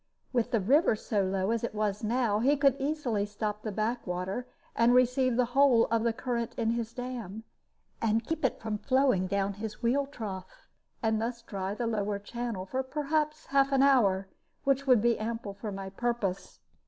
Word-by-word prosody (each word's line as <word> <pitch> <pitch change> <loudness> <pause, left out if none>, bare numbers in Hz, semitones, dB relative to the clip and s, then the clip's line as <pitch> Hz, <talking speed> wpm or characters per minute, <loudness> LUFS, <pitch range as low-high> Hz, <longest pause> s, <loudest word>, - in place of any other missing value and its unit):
With 240 -3 +1
the 230 - +2
river 260 - +4
so 210 -1 -1
low 190 +2 0
as 230 0 -1
it 235 - -3
was 210 0 -1
now, 225 -2 +1
he 280 +6 +3
could 275 -2 +4
easily 275 -7 -1
stop 210 0 -3
the 215 - -4
back 220 +3 -2
water, 185 +7 -3 0.3
and 235 +1 +4
receive 255 0 +3
the 250 0 +3
whole 265 -4 +5
of 230 -1 +2
the 235 0 +2
current 235 0 -3
in 225 -1 0
his 230 -1 -2
dam, 235 -4 -6 0.6
and 225 0 +1
keep 325 - -3
it 260 - +1
from 215 -2 -3
flowing 255 -8 +2
down 200 +1 0
his 220 +2 -6
wheel 275 +4 +2
trough, 195 -9 -8 0.4
and 220 -1 +1
thus 235 0 -3
dry 195 -3 -4
the 240 - -2
lower 210 -3 -1
channel 225 -1 -5
for 260 +7 -2
perhaps 300 +3 -1
half 275 0 +2
an 270 0 +4
hour, 200 -9 +4 0.4
which 275 0 +1
would 245 -5 +5
be 235 -1 +3
ample 225 -2 -4
for 205 +1 -6
my 195 -1 -6
purpose. 215 -3 -3
230 Hz, 190 wpm, -29 LUFS, 205-255 Hz, 0.6 s, whole